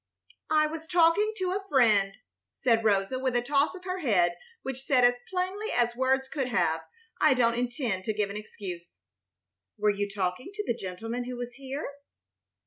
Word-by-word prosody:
"I 310 0 +4
was 320 +1 -5
talking 350 +5 +4
to 370 -2 -1
a 390 +1 -2
friend," 210 - +4 0.4
said 230 -3 +2
Rosa, 205 +4 +2
with 260 -2 0
a 240 - +3
toss 280 +6 +2
of 365 - -10
her 370 0 -3
head 180 - +2 0.3
which 265 -1 -4
said, 265 -2 +3
as 245 0 +3
plainly 375 +4 -2
as 240 -1 +2
words 265 +1 +1
could 270 -2 -2
have 170 -9 +1
done, - - -18 0.3
"I 265 - +6
don't 235 -2 +3
intend 240 -5 -2
to 215 - 0
give 205 -1 0
an - - -7
excuse." 185 -5 -8 0.8
"Were 210 0 +3
you 205 0 -2
talking 195 - -2
to 420 - -2
the - - +1
gentleman 225 +4 -5
who 250 0 -5
was 245 0 -5
here?" 270 +3 -5
245 Hz, 185 wpm, -28 LUFS, 210-295 Hz, 0.8 s, I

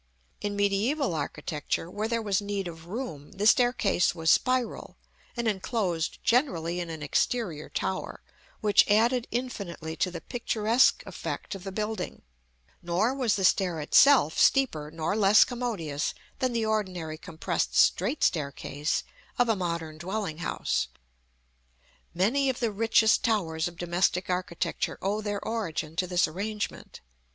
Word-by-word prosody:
In 205 0 -3
mediæval 205 - +1
architecture, 150 +1 -3
where 205 +5 -3
there 230 0 -1
was 200 -2 +1
need 200 -2 -3
of 165 -1 -10
room, 180 - -6
the 200 +1 -2
staircase 225 -7 +3
was 160 -1 +2
spiral, 255 -2 0 0.4
and 235 -1 -1
enclosed 190 -5 -1
generally 180 - +1
in 170 -1 -4
an 160 -2 -6
exterior 165 - -1
tower, 190 - -3 0.4
which 210 -1 +4
added 235 +4 +3
infinitely 195 -10 -4
to 185 - +1
the 170 -2 -6
picturesque 235 +3 +2
effect - - -5
of 195 -2 -8
the 195 - -5
building; 215 +2 -4 0.6
nor 180 +8 +1
was 255 -6 +1
the 195 - -2
stair 180 -3 +2
itself 160 - +5
steeper 160 - +3
nor 160 +4 -2
less 210 0 +6
commodious 210 - -3 0.2
than 255 -1 +1
the 230 -2 0
ordinary 180 -8 -2
compressed 170 0 -3
straight 230 - +3
staircase 145 -1 -1 0.3
of 245 -1 +3
a 225 - +3
modern 170 -4 -3
dwelling 185 -2 -3
house. 170 - -1 1.3
Many 255 +10 +2
of 260 - -2
the 230 -3 0
richest 220 +1 +3
towers 165 -8 0
of 175 -1 -9
domestic 175 +1 0
architecture 180 -2 -2
owe 205 +3 -1
their 205 -1 -3
origin 165 -8 -3
to 185 - +1
this 180 -1 +2
arrangement. 205 +6 -5
195 Hz, 140 wpm, -28 LUFS, 170-225 Hz, 1.3 s, less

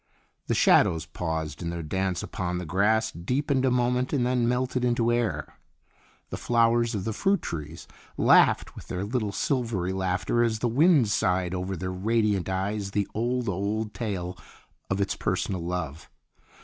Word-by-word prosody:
The - - +1
shadows 80 -1 +4
paused 80 -2 -4
in 85 - -3
their 85 -1 -4
dance 95 +2 -2
upon 90 -1 -3
the 90 - -4
grass, 110 +6 +2
deepened 130 - 0
a - - +4
moment, 125 +1 +1
and 130 -5 +1
then 125 -1 +1
melted 125 0 0
into 120 -1 +2
air. 120 -2 -2 0.7
The - - -3
flowers 115 0 +2
of 100 - -2
the 110 - -2
fruit 195 - +1
trees 75 -3 -6 0.3
laughed - - +4
with - - -11
their 90 +1 -3
little 110 -2 -1
silvery 115 -8 -1
laughter 95 +5 0
as 115 -2 +1
the 120 - 0
wind 140 - +4
sighed 90 -3 +1
over 90 +1 -3
their 95 +2 -4
radiant 105 -1 0
eyes 100 +2 -2
the 100 0 -1
old, 120 +2 -1
old 105 +3 -2
tale 95 -6 -4 0.5
of 95 - -1
its 100 - 0
personal 90 -3 -2
love. 85 -4 -4
105 Hz, 160 wpm, -26 LUFS, 90-120 Hz, 0.7 s, shadows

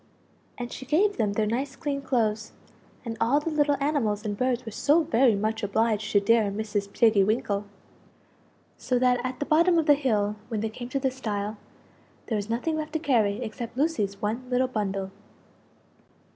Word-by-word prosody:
And 240 -1 -5
she - - -7
gave 395 +8 +2
them 205 -2 +1
their 215 +1 +1
nice 265 +5 -2
clean 285 -3 -3
clothes; 220 -5 -1 0.5
and 230 -1 -4
all 270 +6 +3
the 320 +2 -3
little 295 -2 +2
animals 240 -8 0
and 205 -1 -2
birds 250 +2 -1
were 225 - -6
so 295 +9 +3
very 240 -4 +3
much 215 +2 -1
obliged 215 +1 0
to 205 - +6
dear 220 0 +3
Mrs. 205 -1 -3
Tiggy 215 -2 +4
winkle. 210 -1 0 1.1
So 250 - 0
that 250 0 +2
at 255 0 -3
the 290 - -1
bottom 335 +3 +4
of 325 - +2
the 295 - +7
hill 215 -7 0
when 220 -3 -2
they 220 - -1
came 240 +2 -8
to 275 - -1
the 265 -1 0
stile, 215 -5 -3 0.7
there 225 - -2
was 205 0 -3
nothing 250 +8 -1
left 310 0 -5
to - - +1
carry 235 -7 +1
except 235 +1 -6
Lucie's 215 -10 0
one 230 +4 -3
little 255 +1 +2
bundle. 195 -5 -3
235 Hz, 185 wpm, -26 LUFS, 210-275 Hz, 1.1 s, the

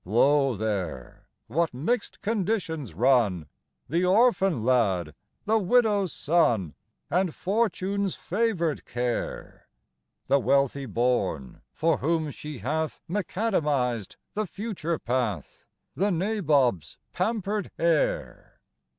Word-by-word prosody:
XI. - - -15
Lo 135 +3 +4
there 100 -5 -4 0.2
what 150 - -1
mix'd 200 - -2
conditions 185 - -2
run! 110 - +3 0.4
The 170 +6 0
orphan 195 - +3
lad; 95 - +2 0.3
the 220 +1 +3
widow's 205 -3 +2
son; 120 - +1 0.4
And 180 -2 +1
Fortune's 200 -1 0
favor'd 185 -6 -1
care 120 0 -4 0.6
The 140 +2 +3
wealthy 140 0 +1
born, 120 - -1
for 165 0 +1
whom 160 0 0
she 150 0 -8
hath 155 +8 -2
Mac 180 -1 -3
Adamised 145 - 0 0.2
the 215 -1 -2
future 180 -5 -3
path 120 - -3 0.3
The 200 +4 +1
Nabob's 155 - +1 0.2
pamper'd 205 0 -1
heir! 165 -3 0
155 Hz, 105 wpm, -26 LUFS, 125-195 Hz, 0.6 s, Lo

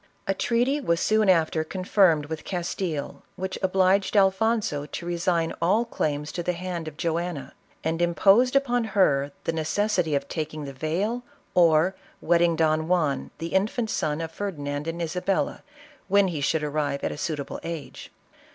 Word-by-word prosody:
A 195 - +1
treat3r 245 +8 +1
was 170 -6 +1
soon 215 -2 +3
after 160 -3 +3
con 185 +3 -6
firmed 175 -6 +4
with 155 +1 -6
Castile 175 -4 -3
which 190 0 -4
obliged 190 +2 +2
Alfonso 195 -6 +2
to 170 - -6
resign 170 -1 0
all 205 +8 +3
claims 150 -8 -2
to 175 - -3
the 180 +1 -1
hand 175 -2 -5
of 155 -1 -8
Joanna, 170 -2 -2 0.3
and 165 +1 -1
imposed 195 +9 +4
upon 245 -3 +2
her 140 -6 +3
the 165 - -1
necessity 165 0 0
of 140 - -1
taking 155 -2 -4
the 140 - -7
veil, 180 - -1 0.3
or 170 +1 +4 0.3
wedding 170 0 +3
Don 155 0 +1
Juan 165 -6 +1
the 165 +2 -5
infant 215 +4 0
son 150 +1 -1
of 165 -1 -4
Ferdi 200 -2 -4
nand 145 +1 -4
and 165 +1 -3
Isabella, 180 +3 -1 0.5
when 200 0 +4
he 155 -4 -3
should 155 +2 +1
arrive 145 -1 -1
at - - 0
a - - -5
suitable 150 -2 -4
age. 160 -6 -7
170 Hz, 165 wpm, -25 LUFS, 155-190 Hz, 0.5 s, firmed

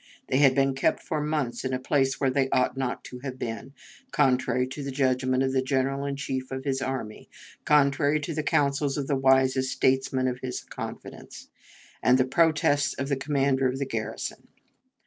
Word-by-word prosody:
They 130 - +2
had 135 -3 +5
been 135 -1 +2
kept 135 - 0
for 155 -3 -2
months 150 -5 -2
in 130 -1 -2
a 130 - -1
place 135 0 +1
where 135 -2 +2
they 135 0 +1
ought 130 0 +1
not 130 -2 -3
to 125 - -9
have 130 0 -6
been, 120 +2 -5 0.4
contrary 130 -2 +2
to 145 - -6
the 140 - -4
judgment 130 -1 +1
of 130 0 0
the 130 - +2
General 135 +1 -1
in 140 - -2
Chief 130 -2 -4
of 130 0 -5
his 135 -1 -1
army, 130 -5 -5 0.4
contrary 145 0 +3
to 165 +3 -4
the 155 - -1
counsels 145 -2 +1
of 140 - -2
the 140 - 0
wisest 130 0 +3
statesmen 130 0 +1
in 125 -1 -1
his 125 -1 -4
confidence, - - -9 0.5
and 125 0 +4
the 130 - +3
protests 145 -1 +2
of 135 +1 -4
the 140 - +2
commander 135 -1 +1
of 130 +1 -2
the 140 - -2
garrison. 115 -4 -5
135 Hz, 190 wpm, -26 LUFS, 130-140 Hz, 0.5 s, had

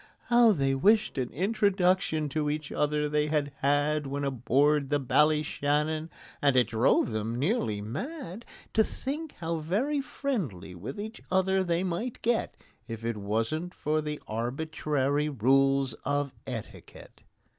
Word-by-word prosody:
How 240 -1 +6
they 135 -7 +1
wished 205 +3 +3
an 125 -1 -1
introduction 185 -5 +1
to 150 +1 -1
each 150 -1 -3
other 150 0 +1
they 150 0 +1
had 150 -2 0
had 145 +1 +1
When 140 +1 -2
on 135 -2 -2
board 140 +4 +2
the 145 - +3
Ballyshannon! 150 +2 +1 0.3
And 140 -2 +3
it 120 -3 +4
drove 115 +1 +3
them 110 +2 -2
nearly 130 - 0
mad 230 - -6 0.3
To 220 - +5
think 290 +7 -5
how 165 -1 -3
very 235 - 0
friendly 170 - -3
with 95 - -7
each 220 +2 -6
other 190 0 +2
they 175 0 0
might 190 +7 -3
get, 235 0 0 0.3
If 115 -1 -6
it 115 -2 -1
wasn't 115 - -2
for 155 +1 0
the 150 -1 -4
arbitrary 145 +4 -1
rule 135 +2 +3 0.2
of 145 -1 -1
etiquette! 120 -5 -9
150 Hz, 145 wpm, -28 LUFS, 135-185 Hz, 0.3 s, How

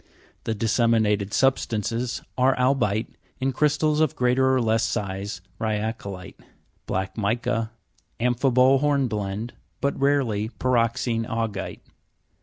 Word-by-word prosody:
The 110 - -1
disseminated 110 -2 +2
substances 120 -2 0
are 130 +1 +3
albi'te, 125 -5 +1 0.3
in 135 0 0
crystals 150 +2 +2
of 155 -4 +2
greater 125 +1 +3
or 130 - +3
less 115 -1 +2
size, 100 -2 -3 0.2
rya'colite, 105 -3 -4 0.5
black 95 +3 -2
mica, 110 +1 0 0.5
amphibole 125 +2 +3
hornblende, 120 -7 -1 0.3
but 140 +2 -1
rarely 125 -7 +1
py' 130 - -3
roxene 115 -1 +1
augi'te. 110 -4 -3
115 Hz, 105 wpm, -24 LUFS, 105-130 Hz, 0.5 s, are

